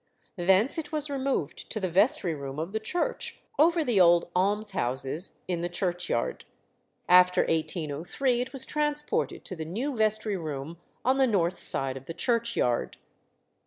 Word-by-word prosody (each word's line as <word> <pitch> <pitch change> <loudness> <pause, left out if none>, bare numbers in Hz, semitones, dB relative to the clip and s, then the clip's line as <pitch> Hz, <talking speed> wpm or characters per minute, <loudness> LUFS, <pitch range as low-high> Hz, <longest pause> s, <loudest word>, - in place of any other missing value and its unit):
Thence 190 - +3
it 295 -2 -6
was 300 -2 -1
removed 265 - -2
to 215 - -2
the 190 - -1
vestry 195 - +2
room 140 -2 -6
of 165 +4 -4
the 220 - -1
church, 350 - -3 0.2
over 330 +1 +4
the 225 -6 +3
old 175 0 +4
almshouses 185 - 0
in 175 -2 -2
the 175 - -2
churchyard. 175 -8 -2 0.6
After 180 0 +6
1803 165 - -1
it 250 +1 -4
was 265 0 +3
transported 300 - -1
to 185 - -4
the 160 - -5
new 235 - -3
vestry 215 -2 +1
room 155 -1 -6 0.3
on 260 +2 +3
the 265 -1 +4
north 185 -5 +1
side 135 -1 0
of 135 - -12
the 165 - -6
churchyard. 230 - 0
190 Hz, 155 wpm, -27 LUFS, 165-255 Hz, 0.6 s, After